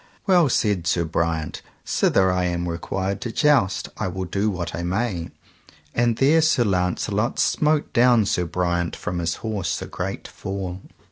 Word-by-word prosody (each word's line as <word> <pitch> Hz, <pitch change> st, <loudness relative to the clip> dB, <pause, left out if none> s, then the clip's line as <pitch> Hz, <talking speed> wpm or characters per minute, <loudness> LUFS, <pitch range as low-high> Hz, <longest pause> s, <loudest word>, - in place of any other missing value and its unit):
Well, 180 Hz, -7 st, +4 dB
said 100 Hz, -8 st, +1 dB
Sir 85 Hz, 0 st, +2 dB
Briant, 80 Hz, -1 st, -2 dB, 0.2 s
sithen 95 Hz, -1 st, +2 dB
I 90 Hz, 0 st, +1 dB
am 85 Hz, 0 st, -1 dB
required 95 Hz, +3 st, -3 dB
to 115 Hz, -, -3 dB
joust 135 Hz, -10 st, +2 dB
I -, -, -2 dB
will 95 Hz, 0 st, -4 dB
do 100 Hz, +4 st, 0 dB
what 90 Hz, -4 st, -4 dB
I 85 Hz, -, -3 dB
may; 90 Hz, -1 st, -2 dB, 0.6 s
and 120 Hz, -1 st, +1 dB
there 150 Hz, +4 st, +4 dB
Sir 155 Hz, -6 st, +3 dB
Launcelot 100 Hz, +3 st, 0 dB
smote 150 Hz, 0 st, +1 dB
down 120 Hz, -2 st, +5 dB
Sir 90 Hz, -2 st, 0 dB
Briant 85 Hz, 0 st, -1 dB
from 90 Hz, -1 st, -4 dB
his 85 Hz, 0 st, -1 dB
horse 100 Hz, -7 st, -2 dB
a -, -, -5 dB
great -, -, -5 dB
fall. 95 Hz, -2 st, -5 dB
95 Hz, 160 wpm, -23 LUFS, 85-115 Hz, 0.6 s, down